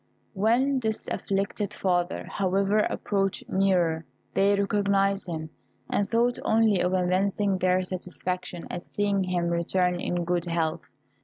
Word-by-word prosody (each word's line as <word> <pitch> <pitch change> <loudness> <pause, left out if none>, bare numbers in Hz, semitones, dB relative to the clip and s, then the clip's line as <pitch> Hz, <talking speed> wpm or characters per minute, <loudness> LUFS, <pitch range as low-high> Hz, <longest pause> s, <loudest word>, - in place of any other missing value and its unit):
When 240 +7 +2
this 220 -3 -3
afflicted 200 +1 -2
father, 175 -1 0
however, 195 +2 +1
approached 195 -2 -1
nearer, 180 -4 +2 0.3
they 200 +1 +4
recognised 200 -1 +1
him, 160 -2 -5 0.4
and 200 - +1
thought 240 +1 +2
only 220 -4 +3
of 180 +1 +1
evincing 190 +2 +1
their 185 0 +2
satisfaction 180 -1 -4
at 175 - -5
seeing 200 -2 0
him 175 -2 0
return 180 +1 +1
in 175 -1 -2
good 175 0 0
health. 165 -1 -1
190 Hz, 130 wpm, -27 LUFS, 180-200 Hz, 0.4 s, they